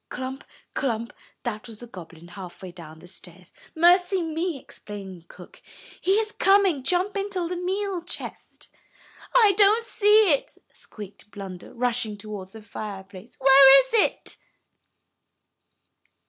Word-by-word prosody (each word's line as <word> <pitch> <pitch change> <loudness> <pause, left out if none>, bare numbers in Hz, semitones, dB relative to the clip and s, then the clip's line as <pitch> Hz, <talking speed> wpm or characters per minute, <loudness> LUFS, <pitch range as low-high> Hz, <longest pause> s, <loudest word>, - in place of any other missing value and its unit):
Clump! 260 +2 -6 0.3
clump! 235 -4 -2 0.3
That 240 -1 -5
was 225 -2 -9
the 240 - -9
goblin, 170 -6 -12
halfway 185 0 -10
down 165 -3 -12
the 170 - -15
stairs. 180 0 -13 0.2
"Mercy 355 +2 +4
me!" 325 0 -3
exclaimed 190 -8 -10
cook. - - -15 0.4
"He 380 +2 +2
is 435 0 0
coming. 390 -9 +3
Jump 365 +8 0
into 390 -3 -2
the 360 - -4
meal 375 +1 -2
chest." 345 - -8 0.7
"I 445 -5 +7
don't 425 +3 +5
see 420 -3 +4
it," 280 - -3 0.2
squeaked 205 -1 -10
Blunder, 190 -3 -9
rushing 235 -3 -2
towards 200 -2 -9
the 220 -1 -11
fireplace. 200 0 -9
"Where 270 0 +8
is 260 - -9
it?" 450 - 0
255 Hz, 130 wpm, -24 LUFS, -, 0.7 s, Where